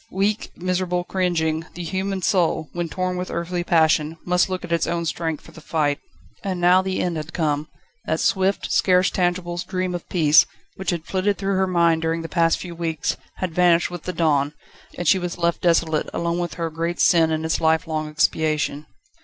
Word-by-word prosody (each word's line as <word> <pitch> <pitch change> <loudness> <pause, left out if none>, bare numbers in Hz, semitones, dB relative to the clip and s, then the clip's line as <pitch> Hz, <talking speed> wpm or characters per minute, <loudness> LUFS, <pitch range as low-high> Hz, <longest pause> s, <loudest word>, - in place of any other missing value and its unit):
Weak, 200 +3 0
miserable, 180 0 -1
cringing, 165 -4 0
the 175 - -5
human 190 +2 -2
soul, 170 -6 +1
when 175 -1 -3
torn 185 +2 -2
with 180 0 -4
earthly 175 +1 -2
passion, 160 -2 +2
must 180 +1 +2
look 185 -1 -3
at 170 - -10
its 170 -1 +1
own 170 0 -1
strength 160 -1 -3
for - - -13
the 165 - -13
fight. 150 -2 0 0.4
And 190 -2 -2
now 180 +1 +5
the 190 0 -2
end 175 -2 -1
had 155 +2 -6
come. 150 -3 0 0.4
That - - 0
swift, 190 +1 +1
scarce 185 0 +3
tangible 175 -1 -1
dream 185 0 -2
of 175 - -6
peace, 155 -4 +5 0.3
which 190 - -4
had 170 -2 -2
flitted 195 +1 0
through 195 0 -1
her 190 0 +2
mind 170 -3 +3
during 165 0 -1
the 165 - -6
past 165 -1 +2
few 175 -2 -7
weeks, 165 -2 -2 0.2
had 185 -3 -4
vanished 175 0 +3
with 175 -2 -6
the 180 - -2
dawn, 150 -3 +1 0.4
and 175 - -3
she 190 - +5
was 180 -1 -4
left 170 -1 0
desolate, 165 -3 +2
alone 170 +1 -1
with 175 -4 -3
her 165 -1 -3
great 165 +2 -3
sin 165 -2 +5
and 160 0 -1
its 160 - 0
lifelong 160 -1 +1
expiation. 155 -1 0
170 Hz, 195 wpm, -22 LUFS, 160-180 Hz, 0.4 s, now